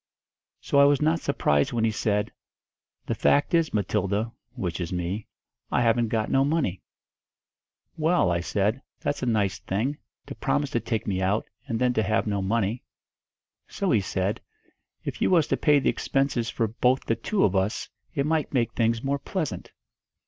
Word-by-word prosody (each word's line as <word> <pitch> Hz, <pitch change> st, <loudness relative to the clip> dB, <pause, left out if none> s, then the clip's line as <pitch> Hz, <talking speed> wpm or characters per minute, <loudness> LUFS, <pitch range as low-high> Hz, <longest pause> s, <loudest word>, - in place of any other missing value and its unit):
So 140 Hz, -, +2 dB
I 140 Hz, -, +8 dB
was 140 Hz, -1 st, +4 dB
not 160 Hz, +2 st, +2 dB
surprised 75 Hz, -, +1 dB
when 115 Hz, -2 st, 0 dB
he 115 Hz, -, +3 dB
said, 105 Hz, -1 st, 0 dB, 0.7 s
'The -, -, -1 dB
fact 145 Hz, +3 st, +2 dB
is 165 Hz, -2 st, +3 dB
Matilda' 105 Hz, +2 st, 0 dB, 0.2 s
which 90 Hz, -1 st, -3 dB
is 85 Hz, -, -4 dB
me 90 Hz, +4 st, -3 dB, 0.4 s
'I -, -, +2 dB
haven't 115 Hz, 0 st, +3 dB
got 110 Hz, -1 st, -1 dB
no 135 Hz, -, +4 dB
money.' 140 Hz, -, 0 dB, 1.2 s
'Well,' 160 Hz, -, +3 dB
I 85 Hz, -, +1 dB
said, 105 Hz, +7 st, 0 dB, 0.2 s
'that's 145 Hz, -, -2 dB
a 125 Hz, -, -1 dB
nice 105 Hz, -6 st, +1 dB
thing, 120 Hz, +10 st, -2 dB, 0.3 s
to -, -, -7 dB
promise 145 Hz, -1 st, -1 dB
to 120 Hz, -, +1 dB
take 115 Hz, -1 st, -2 dB
me 95 Hz, -2 st, -1 dB
out, 100 Hz, +4 st, +1 dB, 0.2 s
and 115 Hz, -, -1 dB
then 125 Hz, +1 st, +2 dB
to 110 Hz, -, +2 dB
have 110 Hz, +2 st, +1 dB
no 100 Hz, -2 st, -1 dB
money.' 110 Hz, +3 st, 0 dB, 0.9 s
So 195 Hz, -3 st, -1 dB
he 110 Hz, -, +4 dB
said, 95 Hz, +1 st, -2 dB, 0.6 s
'If -, -, -5 dB
you -, -, +3 dB
was 170 Hz, -5 st, +4 dB
to -, -, +3 dB
pay 150 Hz, -2 st, +4 dB
the 140 Hz, -, +2 dB
expenses 135 Hz, -4 st, 0 dB
for 115 Hz, -, 0 dB
both 125 Hz, +4 st, +1 dB
the 115 Hz, -, +1 dB
two 190 Hz, -, 0 dB
of 100 Hz, -, +2 dB
us, 95 Hz, +4 st, 0 dB, 0.3 s
it 140 Hz, -2 st, +1 dB
might 155 Hz, -1 st, 0 dB
make 120 Hz, -2 st, +1 dB
things 115 Hz, 0 st, +1 dB
more 140 Hz, +1 st, 0 dB
pleasant.' 165 Hz, 0 st, -4 dB
115 Hz, 180 wpm, -26 LUFS, 100-140 Hz, 1.2 s, I